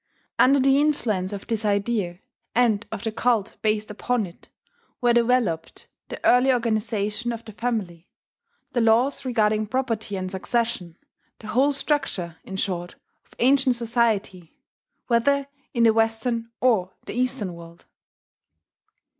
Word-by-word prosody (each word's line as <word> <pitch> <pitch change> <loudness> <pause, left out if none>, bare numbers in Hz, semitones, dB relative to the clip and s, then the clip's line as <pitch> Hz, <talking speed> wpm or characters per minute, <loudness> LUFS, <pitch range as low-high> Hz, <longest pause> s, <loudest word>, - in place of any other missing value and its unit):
Under 275 +2 +6
the 270 +1 +4
influence 215 -11 0
of 200 -1 -6
this 225 -2 -1
idea, 200 -3 0 0.4
and 230 -3 +2
of - - -5
the 225 - -1
cult 225 -2 0
based 215 0 0
upon 235 +1 -1
it, 175 -1 -15 0.5
were 240 -1 +3
developed 235 -9 +1 0.2
the - - -6
early 250 +2 +5
organization 220 -1 -1
of 230 0 -7
the 220 - -9
family, 200 -7 -3 0.6
the 240 - +2
laws 235 +5 +3
regarding 215 -3 +1
property 230 -4 -2
and 185 -1 -4
succession, 195 -3 -2 0.4
the 215 - -10
whole 265 +6 +3
structure, 270 - -1
in 190 - -8
short, 180 -2 -3 0.3
of - - -24
ancient 265 0 +3
society, 225 -7 -1 0.5
whether 275 +4 +2 0.3
in 235 -3 +1
the 225 -1 +6
Western 225 +1 0
or 205 -8 +2
the - - -6
Eastern 250 -6 -1
world. 170 0 -13
225 Hz, 135 wpm, -24 LUFS, 200-245 Hz, 0.6 s, Under